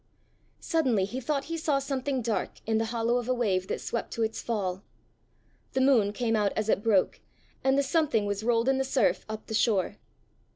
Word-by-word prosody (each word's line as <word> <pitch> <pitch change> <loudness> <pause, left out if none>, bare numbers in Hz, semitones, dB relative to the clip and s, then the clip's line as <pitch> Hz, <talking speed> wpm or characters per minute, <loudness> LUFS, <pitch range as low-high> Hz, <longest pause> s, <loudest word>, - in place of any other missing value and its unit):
Suddenly 255 -12 +1
he 245 +6 -5
thought 275 +2 -1
he 330 +3 -4
saw 300 -3 +1
something 270 -1 -2
dark 220 -1 -1
in 220 0 +1
the 225 - 0
hollow 230 +1 0
of 245 0 -3
a 255 - +2
wave 190 -6 0
that - - -2
swept 235 - -3
to 230 - -1
its 220 0 -2
fall. 195 -5 -2 0.9
The 260 - +1
moon 245 -7 +4
came 225 +1 0
out 210 -2 +1
as 215 0 -1
it 200 - +2
broke, 210 -4 +2 0.4
and 265 +1 +3
the 280 - +3
something 275 -7 +1
was 205 0 -2
rolled 230 +1 +2
in 265 0 +3
the - - +2
surf 260 -4 +1
up 215 0 -6
the 220 - -6
shore. 210 -3 +1
230 Hz, 205 wpm, -28 LUFS, 215-265 Hz, 0.9 s, moon